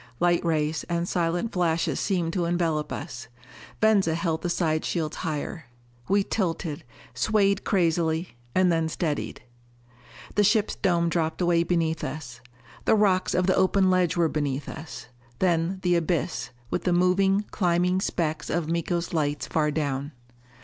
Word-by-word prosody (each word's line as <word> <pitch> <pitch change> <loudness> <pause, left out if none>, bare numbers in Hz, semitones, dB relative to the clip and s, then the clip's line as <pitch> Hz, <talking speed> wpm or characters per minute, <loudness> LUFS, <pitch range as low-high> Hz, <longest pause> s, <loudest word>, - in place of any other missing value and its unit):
Light 175 0 +3
rays 155 -2 0
and 170 0 -1
silent 175 +5 0
flashes 170 -2 +1
seemed 175 -4 0
to 180 -3 0
envelope 165 -3 0
us. 120 -3 -6 0.5
Venza 200 -7 +3
held 165 -1 -1
the 175 - -2
side 160 -2 0
shields 160 -3 -2
higher. 160 0 -4 0.4
We 200 0 +3
tilted, 170 -6 -2 0.3
swayed 200 - +2
crazily, 165 -2 +1 0.3
and 185 -1 +4
then 165 -1 +1
steadied. 155 -6 -3 0.9
The 210 - +3
ship's 215 +1 +3
dome 170 -3 +1
dropped 160 -1 -1
away 175 -2 +3
beneath 165 -2 0
us. 130 -5 -6 0.4
The - - +5
rocks 195 -3 +2
of 180 - +2
the 185 - +3
open 190 0 +3
ledge 180 -2 +2
were 170 -1 +4
beneath 145 -3 -2
us. 160 -6 -8 0.3
Then 175 0 +1
the 180 -1 +3
abyss, 170 -3 -1 0.2
with - - -1
the 180 - +2
moving, 190 +3 +3
climbing 180 0 +1
specks 155 -5 -2
of 165 -2 -1
Miko's 170 +1 -1
lights 145 -4 0
far 155 -1 +1
down. 145 -1 -2
170 Hz, 150 wpm, -26 LUFS, 160-185 Hz, 0.9 s, The